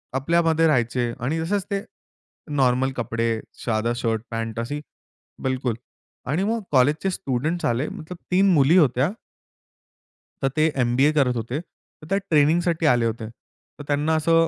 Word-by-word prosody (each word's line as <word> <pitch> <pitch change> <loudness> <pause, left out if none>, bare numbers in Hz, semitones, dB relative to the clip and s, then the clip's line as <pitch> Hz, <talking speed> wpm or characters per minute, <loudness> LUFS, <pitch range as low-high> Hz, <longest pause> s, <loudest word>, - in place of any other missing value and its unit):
आपल्यामध्ये 165 +3 +2
राहायचे 120 -3 +1
आणि 145 +7 -1
तसेच 195 +4 -1
ते 200 0 -1 0.7
नॉर्मल 130 0 +2
कपडे, 115 -1 -1 0.3
साधा 115 0 0
शर्ट 115 -3 -1
पॅन्ट 115 0 -3
असे, 145 +6 -3 0.6
बिलकुल. 130 -3 -1 0.5
आणि 160 +8 0
मग 225 +2 0
कॉलेजचे 145 +8 +3
स्टुडंट्स 155 +4 -2
आले 120 +5 0
मतलब 170 +3 -8
3 190 +1 +4
मुली 150 +4 +5
होत्या 140 +1 +3 1.3
तर 135 - +2
ते 155 0 +3 0.2
एम-बी-ए 130 +5 +3
करत 125 -3 +3
होते. 120 +5 -3
तर 165 -2 -17
त्या 195 - +3
ट्रेनिंगसाठी 165 +2 +3
आले 120 -1 +1
होते. 110 -1 -8
तर 145 +4 -17
त्यांना 150 +2 +1
असं 165 +1 +4
140 Hz, 140 wpm, -23 LUFS, 120-165 Hz, 1.3 s, मुली